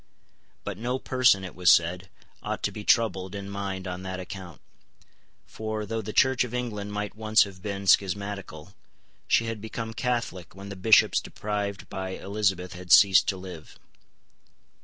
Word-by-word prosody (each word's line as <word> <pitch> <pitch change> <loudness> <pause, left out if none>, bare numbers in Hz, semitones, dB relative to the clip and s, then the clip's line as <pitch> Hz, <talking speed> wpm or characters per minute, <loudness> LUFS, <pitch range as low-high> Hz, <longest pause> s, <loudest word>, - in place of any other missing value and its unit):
But 100 -2 -6
no 125 +3 -1
person, 130 -7 +3
it 90 - -7
was 90 -1 +5
said, 90 +3 +2 0.3
ought - - -4
to - - 0
be 105 - -8
troubled 105 -5 +1
in 100 -1 -6
mind 100 -1 -4
on 90 0 -5
that 95 0 -5
account; 90 -4 -8 0.9
for, 110 -1 -5
though 115 +2 -3
the 110 +1 -6
Church 130 +2 +3
of 125 -1 -6
England 105 -5 -4
might 105 0 -4
once 110 +1 +4
have 95 -2 -10
been 100 0 -4
schismatical, 100 -3 0 0.5
she 115 - +3
had 115 -2 -4
become 115 +1 -5
Catholic 115 -9 -3
when 100 +1 -9
the 100 - -6
Bishops 105 +4 +5
deprived 100 -1 -4
by 95 0 -5
Elizabeth 95 -3 -1
had 90 0 -8
ceased 95 -2 +7
to 95 - 0
live. 90 -4 -10
100 Hz, 160 wpm, -26 LUFS, 95-110 Hz, 0.9 s, ceased